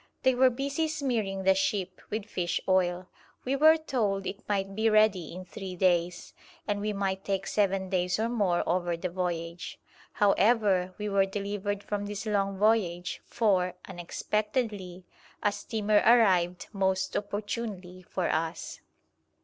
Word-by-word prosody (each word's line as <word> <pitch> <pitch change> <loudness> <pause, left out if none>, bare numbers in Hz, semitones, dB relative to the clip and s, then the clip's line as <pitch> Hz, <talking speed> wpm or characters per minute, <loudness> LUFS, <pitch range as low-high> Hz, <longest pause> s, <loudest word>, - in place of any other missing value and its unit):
They 260 - +4
were 255 +1 +5
busy 280 +5 -1
smearing 235 -11 -2
the 190 0 +5
ship 190 0 -1
with 215 -1 -3
fish 180 -4 -2
oil. 180 -1 +1 0.4
We 265 +2 +1
were 315 +3 +6
told 215 -11 -1
it 200 - -5
might 195 -1 -1
be 220 +2 +2
ready 215 -6 +3
in 185 +2 -8
three 185 0 -7
days, 175 -1 +1 0.3
and 205 -1 -1
we 210 +1 -1
might 195 -1 -2
take 195 -1 -2
seven 195 -2 +1
days 180 -1 0
or 220 +1 0
more 205 -7 0
over 175 -1 0
the 180 +2 -3
voyage. 170 -1 -4 0.4
However, 200 -3 +3
we 210 - -3
were 195 -1 +2
delivered 205 0 -3
from 205 -1 -3
this 205 +1 -5
long 195 -2 0
voyage, 190 -5 +1
for, 185 -5 +1
unexpectedly, 195 +1 -3 0.4
a 205 - +3
steamer 215 -1 +1
arrived 185 -7 +4
most 190 -1 0
opportunely 205 -3 -4
for 180 0 -3
us. 160 +1 -3
195 Hz, 145 wpm, -28 LUFS, 180-215 Hz, 0.4 s, were